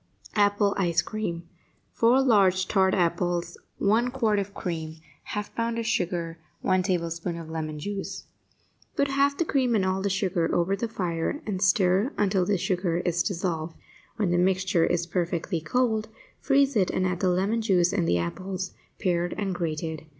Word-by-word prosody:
APPLE 205 -1 +3
ICE 170 -3 +2
CREAM 175 -6 -4 0.5
4 245 +4 +4
large 190 -6 +4
tart 190 -2 +3
apples 175 0 0 0.2
1 225 +5 +2
quart 225 -5 +1
of 200 0 -3
cream 160 -5 -4 0.4
1/2 210 0 -4
pound 230 0 -1
of 230 - -2
sugar 170 -4 -1 0.2
1 185 0 +2
tablespoonful 170 -2 -2
of 160 -1 -8
lemon 155 -1 -4
juice 200 +5 -5 0.7
Put 280 - +1
half 280 +1 +2
the 340 - +1
cream 255 -6 +1
and 195 -3 +2
all 190 0 0
the 200 - 0
sugar 185 -3 0
over 175 +3 +2
the 230 +4 -2
fire 180 - -2
and 190 -4 -3
stir 195 - +3
until 195 -3 +2
the 205 - +2
sugar 180 -2 0
is 175 -1 +1
dissolved. 170 -3 -2 0.4
When 200 -5 0
the 175 - +2
mixture 185 -2 +2
is 175 -1 0
perfectly 175 0 -2
cold, 220 +4 0 0.3
freeze 275 -1 +3
it 190 -4 +3
and 185 - 0
add 180 -1 -1
the 185 - +2
lemon 195 +6 +1
juice 185 -5 +2
and 180 -5 +1
the 85 - +3
apples, 185 - -4 0.3
pared 175 -2 0
and 195 -2 -1
grated. 160 -2 -3
185 Hz, 170 wpm, -26 LUFS, 170-210 Hz, 0.7 s, 4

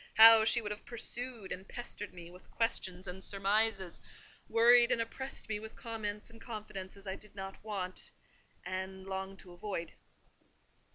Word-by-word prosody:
how 225 0 +11
she 230 +1 +5
would 210 - -3
have 210 - -5
pursued 235 -2 -2
and 190 +1 -5
pestered 240 -4 -6
me 175 -1 -10
with 180 +1 -15
questions 190 -5 -1
and 185 +1 -6
surmises—worried 220 +4 +2
and - - +3
oppressed 265 +4 -3
me 215 -1 -1
with 220 +1 -9
comments 215 -3 -4
and 225 - -15
confidences 200 -3 -7
I 190 -1 -3
did 210 0 -13
not 195 0 -7
want, 195 -4 -3 0.6
and 190 0 -4
longed 190 0 -4
to 180 - -13
avoid. 175 -1 -4
205 Hz, 150 wpm, -34 LUFS, 190-225 Hz, 0.6 s, how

